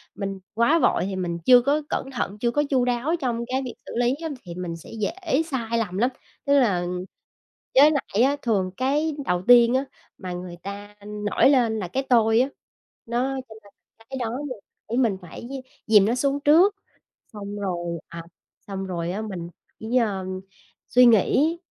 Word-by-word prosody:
mình 195 -1 -4
quá 235 +9 +3
vội - - +2
thì 195 - -3
mình 175 -2 -2
chưa 250 -1 +8
có 285 +4 +1
cẩn 270 - -2
thận, 225 -5 -3
chưa 235 +1 +1
có 295 +5 +1
chu 255 -3 +2
đáo 250 +6 0
trong 235 -4 -2
cái 260 +1 -1
việc 245 - -5
xử - - -9
lý 245 +1 +2
á, 320 - -2
thì 175 -2 -8
mình 180 -2 -4
sẽ - - -14
dễ 320 - 0
sai 230 -3 -1
lầm 195 -5 -2
lắm. 245 +5 +3 0.4
Tức 280 0 +4
là 185 -8 +2 0.9
với 290 +3 +8
lại 250 -6 0
á, 280 +2 +3
thường 195 -6 0
cái 290 +4 0
đầu 180 0 0
tiên 240 0 +7
á 270 +2 +1 0.3
mà 185 -2 -6
người 180 0 -7
ta 205 +1 -8
nổi 210 +4 +2
lên 235 -5 +3
là 185 - -3
cái 265 +10 -2
tôi 225 -2 +4
á. 265 - 0 0.6
Nó 250 +3 -1
cho 220 - -11
nên 200 0 -19 0.4
cái 265 - -5
đó 235 0 -2
mình 255 -6 -6 0.3
phải 235 - -1
mình 225 -7 +2
phải 175 - -10
d - - -9 0.4
dìm 210 -3 +6
nó 230 - +1
xuống 280 +2 0
trước, 345 +8 +5 0.6
xong 205 -1 -7
rồi, 175 -4 -3
à, 170 0 -8 0.5
xong 195 -1 -4
rồi 175 -2 -3
á 205 - -3
mình 185 -6 -6 0.3
chỉ, 225 +3 -3
ờ, 200 -5 0 0.6
suy 250 0 +6
nghĩ 270 - +4
230 Hz, 195 wpm, -24 LUFS, 195-265 Hz, 0.9 s, chưa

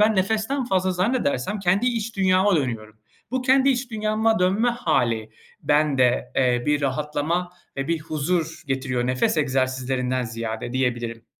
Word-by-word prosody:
ben 215 0 +4
nefesten 220 +8 0
fazla 190 -5 +1
zannedersem 190 - 0
kendi 195 +5 +1
iç 230 -2 -2
dünyama 190 0 +3
dönüyorum. 115 -6 -3 0.3
Bu 260 0 -1
kendi 265 +1 +4
iç 250 -1 0
dünyama 220 +1 +1
dönme 195 +6 +2
hâli 125 - 0 0.3
bende, 145 -5 +2
eee, 125 -2 +2
bir 150 0 +2
rahatlama 150 +5 -1 0.2
ve 135 0 -3
bir 165 -1 +1
huzur 160 +1 -2
getiriyor, 130 -2 -1
nefes 130 +5 +1
egzersizlerinden 130 -2 0
ziyade 115 0 -5
diyebilirim. 120 -3 -2
155 Hz, 135 wpm, -23 LUFS, 130-210 Hz, 0.3 s, ben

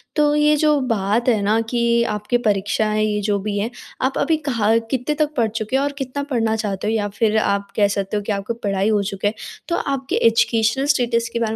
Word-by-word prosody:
तो 295 -2 +3
ये 300 0 +4
जो 300 -1 +3 0.2
बात 210 +5 0
है 220 -4 +2
ना 210 +3 +2
कि 235 -1 +2
आपकी 210 +4 0
परीक्षाएँ 210 +1 +1
ये 210 -1 -1
जो 205 0 0
भी 205 +1 -3
हैं, 215 +3 -1 0.3
आप 260 +1 0
अभी 320 +1 +2
कहाँ 225 -2 +2
कितने 265 +3 -1
तक 305 0 0
पढ़ 230 - +3
चुके 220 +2 -3
हो 275 - +1
और 285 - -1
कितना 275 +1 -4
पढ़ना 225 -2 +1
चाहते 210 -2 -3
हो? 220 - +1
या 210 -2 0
फिर 215 +1 +1
आप 200 -1 0
कह 205 -2 +4
सकते 200 +1 -2
हो 205 - -3
कि 215 - -3
आपको 200 +3 -2
पढ़ाई 200 -3 -1
हो 210 -2 +2
चुका 195 0 -2
है, 205 - 0 0.3
तो 340 - 0
आपके 270 -3 -2
एजुकेशनल 230 +3 +2
स्टेटस 235 -2 0
के 235 - -1
बारे 225 -1 -1
225 Hz, 230 wpm, -20 LUFS, 205-255 Hz, 0.3 s, ये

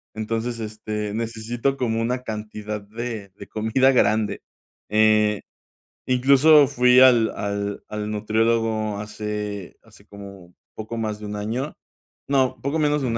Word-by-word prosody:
entonces, 115 +2 -3
este, 105 -1 -4
necesito 115 +4 -2
como 115 -3 -1
una 125 +2 -1
cantidad 105 -1 -5
de 110 -1 -6
de - - -10
comida 110 +5 +2
grande, 110 -4 +1 0.5
eh, 105 -1 +3 0.7
incluso 140 +4 +6
fui 125 0 +4
al 120 -4 +6
al 100 0 -3
al 105 0 -4
nutriólogo 110 0 0
hace 105 -2 -5
hace - - -20
como 100 -3 -12 0.2
poco 110 +2 -6
más 110 -2 -3
de 105 - -8
un 105 - -5
año, 120 +8 -3 0.6
no, 135 -2 +1
poco 140 +4 -1
menos 150 -1 +1
de - - 0
un 115 -1 -1
110 Hz, 135 wpm, -23 LUFS, 105-125 Hz, 0.7 s, incluso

